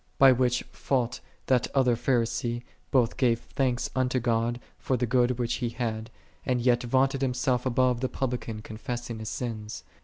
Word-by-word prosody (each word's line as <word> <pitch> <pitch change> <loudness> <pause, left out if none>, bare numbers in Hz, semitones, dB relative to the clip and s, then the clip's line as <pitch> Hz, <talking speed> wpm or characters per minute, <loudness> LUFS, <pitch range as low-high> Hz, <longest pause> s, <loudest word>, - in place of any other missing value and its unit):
By 135 -1 +8
which 125 -1 +2
fault 125 -3 -1 0.3
that 125 -3 +2
other 125 -3 +4
Pharisee 120 -1 0 0.3
both 125 -4 +2
gave 120 -3 +3
thanks 125 -1 -1
unto 130 0 +1
God 120 0 0 0.2
for 130 - 0
the 125 - +1
goods 125 +1 +2
which 120 -1 -1
he 120 - 0
had, 115 -2 -3 0.3
and 125 -1 0
yet 120 0 +3
vaunted 130 +2 +1
himself 125 -1 +1
above 125 -1 +2
the 130 - 0
Publican 120 -4 -3
confessing 115 +1 -5
his 110 - -5
sins. 110 -3 -5
125 Hz, 160 wpm, -27 LUFS, 115-130 Hz, 0.3 s, By